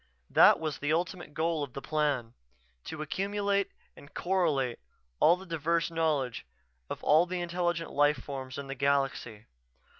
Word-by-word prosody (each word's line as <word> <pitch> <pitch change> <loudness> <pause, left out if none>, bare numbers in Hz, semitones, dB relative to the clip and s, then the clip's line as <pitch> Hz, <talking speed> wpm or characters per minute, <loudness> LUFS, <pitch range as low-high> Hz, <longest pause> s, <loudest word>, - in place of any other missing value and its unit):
That - - +7
was 155 -4 -3
the 145 +1 -1
ultimate 170 -2 -2
goal 165 -1 0
of 140 -4 -5
the - - -5
Plan: 145 -7 0 0.5
to 155 -1 -5
accumulate 200 +4 0 0.3
and 140 - -15
correlate 155 -10 0 0.4
all 170 +3 +6
the 190 - -11
diverse 165 0 0
knowledge 150 -7 0 0.5
of - - -6
all 160 +4 +5
the 180 0 -3
intelligent 175 -1 -1
life 145 0 +3
forms 130 0 -7
in 140 - -5
the 135 - -5
galaxy. 135 -5 -1
155 Hz, 150 wpm, -30 LUFS, 140-175 Hz, 0.5 s, That